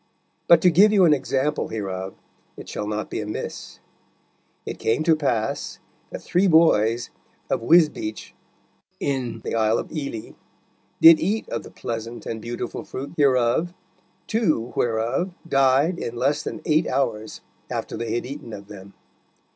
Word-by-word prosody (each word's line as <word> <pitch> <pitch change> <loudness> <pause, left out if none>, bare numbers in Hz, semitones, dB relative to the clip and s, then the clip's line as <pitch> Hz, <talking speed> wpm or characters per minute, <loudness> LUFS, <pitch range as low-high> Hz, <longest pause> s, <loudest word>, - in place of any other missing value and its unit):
But 170 -1 +7
to 180 - +6
give 200 +6 +6
you 195 -4 +5
an 155 - +6
example 135 +1 -1
hereof 95 -3 -5 0.4
it - - -10
shall 105 - -4
not 105 0 -4
be - - -2
amiss. 105 0 -6 0.9
It - - -6
came 115 +8 +1
to 165 0 +4
pass 120 -8 -2 0.3
that - - -8
three 185 +3 +2
boys 120 - +3 0.4
of - - +1
Wisbeach, 150 -6 +2 0.7
in 125 -5 -2
the - - -5
Isle 110 0 +2
of - - -5
Ely, 140 -8 -5 0.7
did 165 0 +9
eat 210 +5 -1
of - - -3
the - - -12
pleasant 115 0 -6
and 110 -1 -5
beautiful 120 +1 -5
fruit 135 +4 -7
hereof, 140 +4 +2 0.5
two 155 - 0
whereof 120 +11 -1
died 135 +4 +3
in 120 - -4
less 135 +5 +1
than - - -6
eight 155 +1 +2
hours 110 -5 -2 0.3
after - - -4
they 115 -1 -3
had 120 - -2
eaten 135 -3 -8
of 100 -1 -9
them. 100 -1 -12
130 Hz, 150 wpm, -23 LUFS, 110-160 Hz, 0.9 s, did